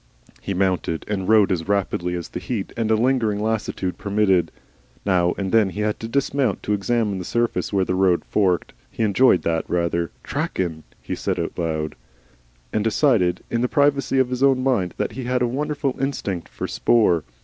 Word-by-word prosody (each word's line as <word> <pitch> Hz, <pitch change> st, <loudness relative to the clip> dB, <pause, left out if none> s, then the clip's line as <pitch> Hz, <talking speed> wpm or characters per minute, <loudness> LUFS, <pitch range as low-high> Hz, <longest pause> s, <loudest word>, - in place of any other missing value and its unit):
He 100 Hz, -, -3 dB
mounted 90 Hz, -3 st, 0 dB
and 100 Hz, -2 st, -2 dB
rode 105 Hz, -3 st, +5 dB
as 85 Hz, -2 st, -1 dB
rapidly 95 Hz, -3 st, 0 dB
as 85 Hz, -1 st, -5 dB
the -, -, -5 dB
heat 110 Hz, -6 st, -4 dB
and 115 Hz, -2 st, -1 dB
a 110 Hz, -, +4 dB
lingering 115 Hz, -3 st, +1 dB
lassitude 105 Hz, -4 st, -2 dB
permitted. 100 Hz, -4 st, +2 dB, 0.5 s
Now 90 Hz, -3 st, +2 dB
and 95 Hz, -2 st, -2 dB
then 110 Hz, -3 st, +4 dB
he 105 Hz, -, -5 dB
had 105 Hz, 0 st, -1 dB
to 115 Hz, -, -5 dB
dismount 135 Hz, -3 st, 0 dB
to 105 Hz, -, 0 dB
examine 105 Hz, -1 st, 0 dB
the -, -, -4 dB
surface 120 Hz, +5 st, -1 dB
where 95 Hz, -2 st, +2 dB
the 90 Hz, -, -1 dB
road 95 Hz, -2 st, +2 dB
forked. 95 Hz, -4 st, +1 dB, 0.2 s
He 115 Hz, -, -3 dB
enjoyed 105 Hz, -1 st, +4 dB
that 80 Hz, -1 st, 0 dB
rather. 85 Hz, -1 st, 0 dB
"Trackin'," 85 Hz, -4 st, -2 dB, 0.2 s
he -, -, -4 dB
said -, -, -2 dB
aloud, 80 Hz, -2 st, -2 dB, 0.8 s
and 105 Hz, -, +1 dB
decided 110 Hz, -6 st, +2 dB
in 115 Hz, -, 0 dB
the 125 Hz, -, +2 dB
privacy 140 Hz, -1 st, +2 dB
of 130 Hz, -1 st, +3 dB
his 125 Hz, 0 st, -2 dB
own 135 Hz, -2 st, +4 dB
mind 110 Hz, -10 st, 0 dB
that -, -, -1 dB
he 125 Hz, +3 st, -6 dB
had 125 Hz, 0 st, +1 dB
a -, -, +2 dB
wonderful 145 Hz, +1 st, -2 dB
instinct 100 Hz, -, -3 dB
for -, -, -5 dB
'spoor. 90 Hz, -9 st, +3 dB
105 Hz, 185 wpm, -22 LUFS, 90-120 Hz, 0.8 s, rode